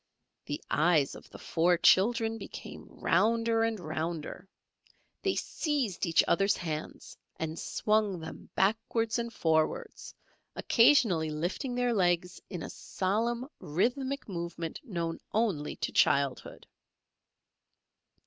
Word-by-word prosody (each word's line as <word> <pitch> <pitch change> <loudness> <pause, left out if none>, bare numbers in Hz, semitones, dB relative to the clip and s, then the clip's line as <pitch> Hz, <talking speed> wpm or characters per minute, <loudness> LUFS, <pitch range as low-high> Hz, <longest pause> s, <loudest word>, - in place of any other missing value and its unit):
The 145 - -3
eyes 155 -3 +3
of - - -12
the - - -11
four 175 +1 +2
children 225 +5 +3
became - - -9
rounder 225 +5 +2
and 225 -2 0
rounder. 165 +3 -4 0.7
They - - 0
seized 260 - -1
each 165 - +4
other's 195 +3 +3
hands 155 -2 -6 0.2
and 160 0 -4
swung 210 -4 0
them 160 0 -9
backwards 225 +3 +1
and 235 0 -3
forwards, 160 -6 -1 0.4
occasionally 230 - +4
lifting 175 - -3
their 245 -1 +1
legs 180 -3 +1
in 180 -5 -5
a - - -6
solemn 230 +6 -1
rhythmic 260 - -1
movement 170 -3 -5
known 170 -9 -3 0.2
only 200 -10 0
to - - -3
childhood. 140 -2 +1
190 Hz, 110 wpm, -30 LUFS, 165-230 Hz, 0.7 s, each